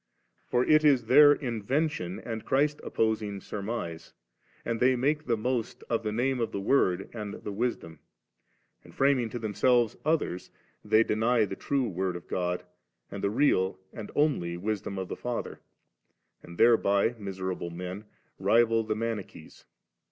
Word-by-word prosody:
For 125 0 +1
it 155 0 +5
is 135 -6 +4
their 145 +5 +8
in 120 -6 -1
vention 125 - -1
and 115 -2 -4
Christ 145 +2 +1
opposing 110 -3 -1
surmise, 100 -5 -5 0.5
and 115 -1 -2
they 130 +1 +4
make 150 +5 0
the 115 -2 +1
most 120 +1 -2
7 - - -14
of 115 - +1
the 110 -1 -3
name 125 +4 0
of 115 - -1
the 100 - -3
Word 95 -4 +2
and 105 -3 -5
the 105 - -7
Wisdom; 100 -8 -3 0.8
and - - -16
framing 135 -4 +2
to 120 - -5
themselves 120 +1 +2
others, 150 - -1 0.3
they 110 +1 +4
deny 115 +1 +2
the 95 - -6
true 135 +2 -1
Word 95 -2 -2
of 85 - -9
God, 90 0 -2 0.5
and 100 0 -6
the 100 - +2
real 95 -6 +2 0.2
and 110 -3 -7
only 115 - +1
Wisdom 100 +1 -3
of 95 -1 -3
the - - -5
Father^ 120 -1 -4 0.8
and 85 0 -12
thereby, 115 -2 +4
miserable 95 -3 -4
men, 90 +4 -7 0.3
rival 115 -1 +3
the 110 -1 -2
Mani* 115 -1 -2
chees. - - -16
110 Hz, 160 wpm, -28 LUFS, 100-125 Hz, 0.8 s, their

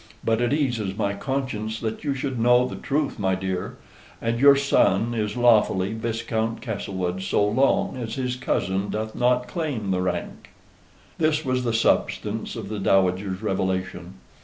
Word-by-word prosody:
But 115 +1 +1
it 120 0 +1
eases 120 -10 -1
my 100 0 0
conscience 110 -2 -3
that 110 -1 -4
you 140 -2 -1
should 130 -2 -3
know 125 +2 +4
the - - -6
truth, 145 -2 -2
my 95 -2 +1
dear. 95 -1 -4 0.4
And 115 0 -1
your 140 +1 +8
son 120 -5 +2
is 105 -1 -2
lawfully 110 -5 +3
Viscount 115 0 -2
Castlewood 95 -5 -3
so 100 +2 +1
long 130 +6 +2
as 115 -2 -4
his 125 -1 -2
cousin 95 -6 -1
doth 110 0 -3
not 125 0 +1
claim 125 - -3
the 90 -1 +1
rank." 90 -1 -4 0.7
This 155 -1 +1
was 130 -1 0
the 120 - 0
substance 110 -1 0
of 110 -4 -6
the 105 0 -4
Dowager's 95 +1 +1
revelation. 95 -2 -2
110 Hz, 160 wpm, -24 LUFS, 95-125 Hz, 0.7 s, your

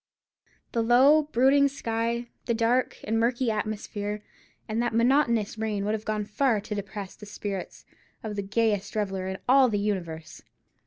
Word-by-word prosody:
The 230 - 0
low, 275 +6 +5
brooding 275 +3 +5
sky, 235 -3 -2 0.2
the 235 - +1
dark 240 +3 +1
and 225 +1 0
murky 240 +1 +1
atmosphere, 210 -1 -3 0.4
and 220 +2 -1
that 240 -2 -1
monotonous 235 -3 +2
rain 210 -2 -1
would 210 - 0
have 220 0 -4
gone 215 -1 -1
far 225 +2 +1
to 210 +1 -6
depress 200 -1 -6
the 210 - -12
spirits 200 -2 -6 0.4
of 215 -2 -4
the 200 - -1
gayest 210 0 0
reveller 195 -3 -2
in 190 0 -3
all 260 0 +6
the 210 - 0
universe. 170 -6 -3
220 Hz, 160 wpm, -27 LUFS, 205-240 Hz, 0.4 s, all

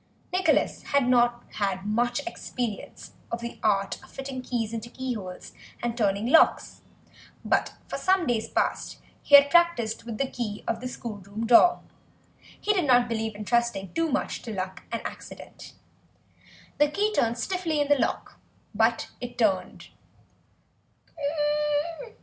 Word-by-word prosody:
Nicholas 370 0 +2 0.2
had 265 -3 +3
not 240 -1 +3
had 195 -2 -1
much 240 +5 0
experience 245 - -5 0.2
of 235 - -2
the 235 0 -7
art 200 -2 +1
of - - -16
fitting 270 -1 -6
keys 235 -3 -3
into 230 +1 -5
keyholes 230 -9 -6 0.3
and 240 -1 -1
turning 205 -2 +1
locks, 285 +7 +3 0.6
but - - +1
for - - -4
some 375 -2 +2
days 230 -4 -1
past - - -1 0.2
he 285 - +6
had 280 0 +8
practised 340 -12 +3
with 230 -2 -6
the 275 - +1
key 220 -5 -5
of 225 0 -1
the 255 - -3
schoolroom 215 -3 -6
door; 245 +10 +6 0.8
he 420 - +1
did 370 -5 +1
not 245 -3 +5
believe 220 -2 -2
in 210 0 -7
trusting 235 -5 0
too 330 -1 0
much - - -1
to 230 - -7
luck 190 -2 -4
and 230 - -4
accident. - - -9 1.1
The 295 0 +5
key 415 +7 0
turned 235 - +1
stiffly 345 -1 -1
in 290 - +1
the 290 -1 +3
lock, 230 - -2 0.3
but 225 +2 +1
it 245 -1 -7
turned. 200 -5 0
235 Hz, 145 wpm, -26 LUFS, 215-275 Hz, 1.1 s, had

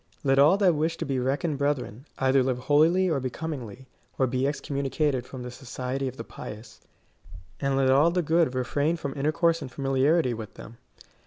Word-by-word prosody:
" - - -36
Let 135 0 +3
all 150 +7 +6
that 190 -4 +4
wish 160 +2 -1
to - - -3
be 135 -2 -1
reckoned 140 +4 -1
brethren, 140 -3 -2
either 135 0 +3
live 130 -1 0
holily 160 +8 +3
and 145 -5 0
becomingly, 130 -3 -5 0.3
or 130 - +3
be 130 +1 -1
excom 140 0 -2
municated 135 -2 0
from 130 -1 -8
the 125 - -6
society 130 +1 -4
of 130 0 -6
the 115 - -5
pious, 110 0 -10 0.8
and 135 -1 0
let 135 -1 +3
all 145 +5 +5
the 175 +1 0
good 160 -4 +2
refrain 145 +6 0
from 140 -4 -5
intercourse 160 +3 +1
and 135 -3 -7
familiarity 135 +2 +1
with 110 -2 -8
them. 115 +1 -12
135 Hz, 190 wpm, -26 LUFS, 130-155 Hz, 0.8 s, all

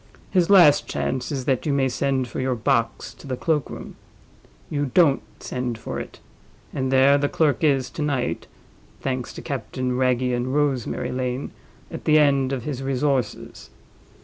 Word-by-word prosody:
His 180 -2 +2
last 175 -8 +6
chance 130 +4 -2
is 135 -3 -3
that 135 +1 0
you - - +2
may 135 -1 +2
send 130 0 0
for 115 - -6
your 130 -1 0
box 115 0 0
to - - -14
the 130 -2 -3
cloak 155 -1 0
room—you 145 -1 -8
don't 160 -7 +5 0.2
send 125 -2 -3
for 115 - -5
it—and 130 -1 -8
there 135 +2 +5
the 145 0 0
clerk 155 +1 +1
is 135 -4 +3
to 155 - -6
night 140 -4 -1 0.5
(thanks 130 -2 -3
to - - -9
Captain 130 -1 -3
Wragge 125 -1 +1
and 125 +3 -2
Rosemary 140 -5 0
Lane) 125 +1 -3 0.4
at - - -7
the 155 0 +5
end 140 -3 +3
of 130 -4 -3
his 135 -2 -4
resources. 135 -3 -2
135 Hz, 160 wpm, -23 LUFS, 125-145 Hz, 0.5 s, last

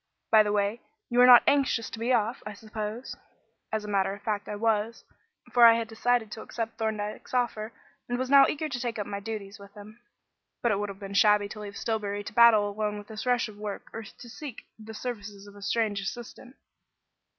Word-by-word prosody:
By 220 -1 +8
the 210 -1 0
way, 205 +3 0 0.3
you 245 +1 +4
are 250 - +8
not 245 -1 +9
anxious 275 -5 +1
to 225 - -7
be 235 +3 0
off, 230 0 +1
I 210 - -7
suppose?" 215 +3 -6 0.6
As 215 -1 -2
a - - -7
matter 195 -1 0
of 205 - -16
fact, 210 -2 -2
I 210 - -3
was; 220 +1 0 0.5
for 245 - +5
I 230 -1 +9
had 230 -1 -2
decided 225 0 0
to 220 - -7
accept 230 0 -5
Thorndyke's 215 +1 -3
offer, 230 -3 -1 0.4
and 245 - -1
was 255 +1 -2
now 275 -1 +8
eager 310 +1 -2
to 270 -5 -4
take 240 -2 -3
up 205 - -3
my 200 - -5
duties 205 -1 -7
with 200 0 -14
him. 210 +2 -13 0.6
But 235 - +3
it 200 - 0
would 205 0 -3
have 195 - -8
been 195 0 -8
shabby 210 0 +4
to 215 - -8
leave 205 -1 -8
Stillbury 205 -3 -2
to 210 - -8
battle 225 -2 +6
alone 210 0 -2
with 205 +1 -10
this 220 +3 -6
rush 245 -1 +2
of 210 -1 -12
work 210 -1 -6
or 225 - -5
to 225 +3 -13
seek 245 +1 -9 0.2
the 220 0 -10
services 210 -4 -6
of 205 0 -14
a 205 - -13
strange 210 -1 0
assistant. 240 +5 -8
220 Hz, 220 wpm, -27 LUFS, 205-235 Hz, 0.6 s, not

